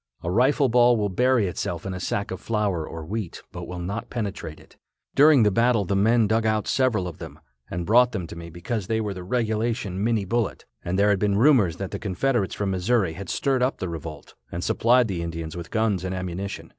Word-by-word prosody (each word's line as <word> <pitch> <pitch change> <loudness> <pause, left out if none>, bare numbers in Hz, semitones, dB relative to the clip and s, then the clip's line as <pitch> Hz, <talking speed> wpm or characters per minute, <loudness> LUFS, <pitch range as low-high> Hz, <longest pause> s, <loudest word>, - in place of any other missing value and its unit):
A 85 - -2
rifle 130 +7 +3
ball 120 0 +5
will 105 -1 0
bury 125 +2 +2
itself 85 -1 -4
in 95 - -3
a 90 - -5
sack 100 +2 -2
of 95 - -5
flour 100 -8 -1
or 80 -1 -7
wheat, 100 0 -5
but - - -7
will 90 - -6
not 100 +7 -4
penetrate 100 -9 -5
it. - - -20 0.4
During 145 -3 +6
the 105 - +4
battle 115 -1 +2
the 100 - -1
men 110 +3 +4
dug 110 +2 +1
out 110 -1 0
several 120 -8 +1
of 85 - -8
them, - - -9 0.3
and 85 0 -4
brought 125 +5 +5
them 95 -7 -3
to 85 - -9
me 85 0 -8
because 90 +4 -4
they 110 0 0
were 105 -2 -2
the 90 - -7
regulation 110 -2 -1
Minie 110 -3 +1
bullet, 115 +2 -2 0.2
and 90 +2 -2
there 100 +1 +4
had 100 - +1
been 100 -1 +1
rumors 115 - +4
that 95 -1 -5
the - - -4
Confederates 105 +2 -1
from 100 -2 -1
Missouri 95 -1 +1
had 95 +2 -8
stirred 135 -2 0
up 130 +2 +1
the 90 - -4
revolt 80 -1 -8 0.2
and 85 - -4
supplied 120 +1 +3
the 90 -5 -3
Indians 85 -1 -5
with 85 -1 -7
guns 110 -5 0
and 95 0 -3
ammunition. 95 +2 -5
100 Hz, 225 wpm, -24 LUFS, 90-115 Hz, 0.4 s, During